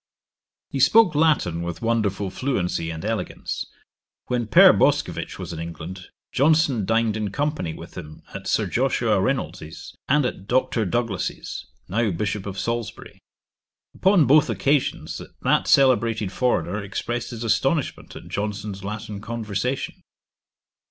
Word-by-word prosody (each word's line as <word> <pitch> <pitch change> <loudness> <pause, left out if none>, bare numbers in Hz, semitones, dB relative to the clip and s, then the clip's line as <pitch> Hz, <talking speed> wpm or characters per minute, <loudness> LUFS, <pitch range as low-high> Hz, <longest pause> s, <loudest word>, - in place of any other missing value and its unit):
He 135 - -2
spoke 220 - +6
Latin 145 - +2
with 85 +5 -5
wonderful 105 -4 0
fluency 90 -11 -1
and 80 +3 -6
elegance. 110 0 -3 0.6
When 120 -2 -1
Pere 110 - +8
Boscovich - - +1
was - - -6
in 80 - -6
England, 85 +3 -7 0.2
Johnson 145 - +3
dined 115 0 +2
in 105 -2 -2
company 145 - -2
with 85 - -11
him 75 -4 -9
at - - -7
Sir - - +2
Joshua 115 -5 +1
Reynolds's, 90 - -3 0.2
and 145 0 +4
at 100 -5 -4
Dr. 120 -2 +1
Douglas's, 115 -2 -3 0.2
now 110 +4 +1
Bishop 100 +2 -2
of 100 -1 -5
Salisbury. 115 +4 -4 0.7
Upon 190 -5 +4
both 150 +3 +5
occasions 140 -1 0 0.2
that - - +2
celebrated 115 -7 +3
foreigner 105 -4 0
expressed 120 +5 -3
his 120 -1 -6
astonishment 130 +6 0
at - - -10
Johnson's 105 -1 -4
Latin 105 0 -5
conversation. 115 +3 -3
110 Hz, 130 wpm, -23 LUFS, 95-130 Hz, 0.7 s, Pere